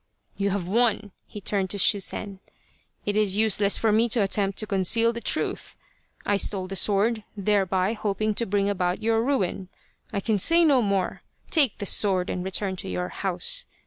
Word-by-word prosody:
" - - -47
You 200 0 -1
have 195 -3 -2
won! 220 -1 +1
" - - -49
He 210 - -9
turned 195 -1 -1
to 200 - -1
Shusen. 200 0 0 0.3
" - - -39
It 205 - -1
is 205 -2 +2
useless 210 -2 +2
for 225 - +1
me 225 +3 +2
to 225 -1 +2
attempt 195 0 0
to 215 - 0
conceal 215 +4 +2
the 235 - -6
truth. - - -3 0.5
I 205 - +2
stole 195 -1 0
the 195 - -6
sword, 210 +3 +1
thereby 195 -1 +1
hoping 215 0 -1
to 235 +3 -1
bring 200 0 0
about 185 -1 -1
your 225 0 +2
ruin. 195 -8 -1 0.4
I 200 - -2
can 210 0 0
say 335 - +5
no 275 -5 +4
more. 200 -3 -1 0.3
Take 285 -9 +3
the 205 - -5
sword 190 -2 +1
and 180 - -3
return 190 0 -1
to 190 - -7
your 180 0 -3
house. 480 - -2
205 Hz, 195 wpm, -25 LUFS, 195-220 Hz, 0.5 s, say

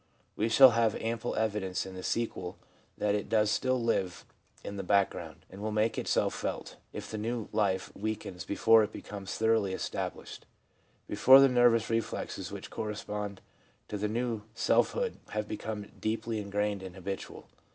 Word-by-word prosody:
We 110 +2 0
shall 130 +3 +9
have 115 -2 +2
ample 115 +1 -2
evidence 105 -5 -1
in 95 - -8
the 95 - -7
sequel 95 -5 -2 0.4
that 105 -1 +1
it 105 - -2
does 105 -1 +3
still 130 +2 +1
live 95 -6 -1 0.4
in 100 - -6
the - - -2
back 100 +1 +3
ground, - - -9
and 95 +2 -11
will 110 +1 -2
make 110 +1 +1
itself - - +1
felt, - - -4 0.2
if - - -7
the 110 - -3
new 115 0 -3
life 100 -3 0
weakens 100 -4 -4
before 110 +6 +5
it 105 - -3
becomes 100 -2 -7
thoroughly 110 -3 +2
established - - -5 0.3
— - - -37 0.2
before 130 +1 +8
the 135 - +8
nervous 120 -2 +4
reflexes 115 -1 -2
which - - -8
correspond 105 -2 -4 0.5
to - - -4
the 105 +1 -1
new 115 -1 -1
self - - +3
hood 485 -1 -2 0.2
have 105 0 -2
become 105 -1 -5
deeply 110 0 -2
ingrained 105 0 -1
and 95 -1 -8
habitual. 95 +1 -6
105 Hz, 170 wpm, -30 LUFS, 100-115 Hz, 0.5 s, shall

